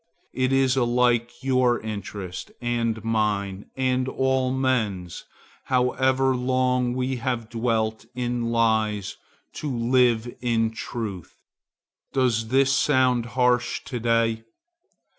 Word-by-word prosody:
It 130 Hz, 0 st, 0 dB
is 135 Hz, -1 st, +3 dB
alike 120 Hz, -1 st, +1 dB
your 130 Hz, -2 st, +2 dB
interest, 100 Hz, -4 st, -6 dB
and 115 Hz, -2 st, -1 dB
mine, 105 Hz, -3 st, -1 dB
and 130 Hz, 0 st, +1 dB
all 130 Hz, -1 st, +1 dB
men's, 110 Hz, -10 st, -1 dB, 0.4 s
however 130 Hz, +1 st, +2 dB
long 125 Hz, -1 st, +1 dB
we 130 Hz, 0 st, -1 dB
have 120 Hz, -3 st, -3 dB
dwelt 110 Hz, -2 st, -1 dB
in 120 Hz, -1 st, -2 dB
lies, 110 Hz, -3 st, +1 dB, 0.4 s
to 150 Hz, -, -4 dB
live 120 Hz, -1 st, +2 dB
in 115 Hz, -2 st, +1 dB
truth. 110 Hz, -5 st, -6 dB, 0.8 s
Does 120 Hz, -4 st, +1 dB
this 135 Hz, +2 st, +3 dB
sound 130 Hz, -5 st, +2 dB
harsh 125 Hz, -1 st, +2 dB
to 125 Hz, -3 st, -5 dB
day? 115 Hz, -1 st, +1 dB
120 Hz, 105 wpm, -24 LUFS, 110-130 Hz, 0.8 s, is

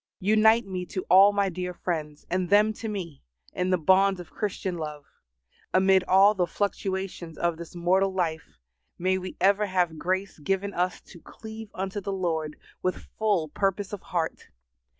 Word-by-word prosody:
Unite 220 Hz, +3 st, +5 dB
me 185 Hz, -2 st, -4 dB
to 180 Hz, +1 st, -5 dB
all 195 Hz, +2 st, +8 dB
my 200 Hz, -1 st, +1 dB
dear 180 Hz, 0 st, -4 dB
friends, 155 Hz, -5 st, -4 dB
and 185 Hz, 0 st, -1 dB
them 210 Hz, +2 st, +5 dB
to 225 Hz, -, -6 dB
me, 180 Hz, -8 st, -5 dB, 0.3 s
in 180 Hz, 0 st, -1 dB
the 185 Hz, -, +3 dB
bonds 190 Hz, +3 st, +3 dB
of 175 Hz, -, -10 dB
Christian 195 Hz, -3 st, -3 dB
love. 150 Hz, -2 st, -6 dB, 0.7 s
Amid 190 Hz, 0 st, +5 dB
all 195 Hz, +3 st, +6 dB
the 180 Hz, -4 st, 0 dB
fluctuations 190 Hz, -4 st, -3 dB
of 170 Hz, -1 st, 0 dB
this 170 Hz, +1 st, -10 dB
mortal 185 Hz, +3 st, +2 dB
life, 165 Hz, -4 st, -3 dB, 0.4 s
may 185 Hz, +1 st, +1 dB
we 185 Hz, 0 st, -7 dB
ever 200 Hz, +2 st, +3 dB
have 175 Hz, -4 st, 0 dB
grace 190 Hz, +1 st, -2 dB
given 195 Hz, +5 st, -1 dB
us 180 Hz, +1 st, -1 dB
to 170 Hz, -, -15 dB
cleave 220 Hz, -1 st, -10 dB
unto 195 Hz, +2 st, -3 dB
the 200 Hz, -, -4 dB
Lord 160 Hz, -5 st, -2 dB, 0.3 s
with 185 Hz, -, -3 dB
full 200 Hz, -8 st, +1 dB
purpose 195 Hz, +4 st, -1 dB
of 205 Hz, -, -5 dB
heart. 165 Hz, -2 st, -3 dB
185 Hz, 170 wpm, -26 LUFS, 175-200 Hz, 0.7 s, all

